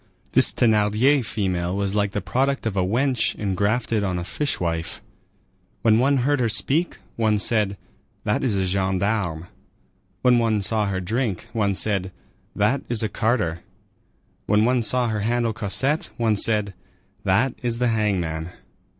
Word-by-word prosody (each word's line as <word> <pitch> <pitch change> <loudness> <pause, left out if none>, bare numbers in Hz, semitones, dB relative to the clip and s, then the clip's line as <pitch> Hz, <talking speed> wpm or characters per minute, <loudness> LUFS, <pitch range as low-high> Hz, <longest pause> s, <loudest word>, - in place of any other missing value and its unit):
This - - +4
Thénardier 110 +5 +3
female 95 -4 -2
was 100 -1 -1
like 100 -1 0
the 105 - -3
product 130 +9 -1
of 110 -3 -2
a 95 - +2
wench 125 +6 0
engrafted 105 +3 0
on 95 -2 -1
a 90 - -3
fishwife. 85 - -3 0.8
When 110 -1 +4
one 140 +3 +3
heard 145 0 +2
her 120 -2 +1
speak, 145 - 0 0.2
one 110 -2 +2
said, 105 -2 +1 0.5
"That 105 - 0
is 115 -7 +1
a 95 - 0
gendarme"; 95 -2 -1 0.8
when 125 -1 +5
one 110 -3 +1
saw 105 +1 0
her 95 -1 -2
drink, 110 0 -2
one 100 -3 0
said, 95 -2 0 0.4
"That 125 +7 +1
is 115 -2 +2
a 110 - 0
carter"; 105 -6 0 0.9
when 105 +1 +3
one 125 0 +2
saw 125 +2 +1
her 110 -2 -1
handle 115 +1 0
Cosette, 120 +7 -1
one 115 -2 +2
said, 105 -1 +2 0.5
"That 115 +7 +2
is 120 -2 0
the 125 0 +1
hangman." 90 -7 -1
105 Hz, 150 wpm, -23 LUFS, 95-120 Hz, 0.9 s, when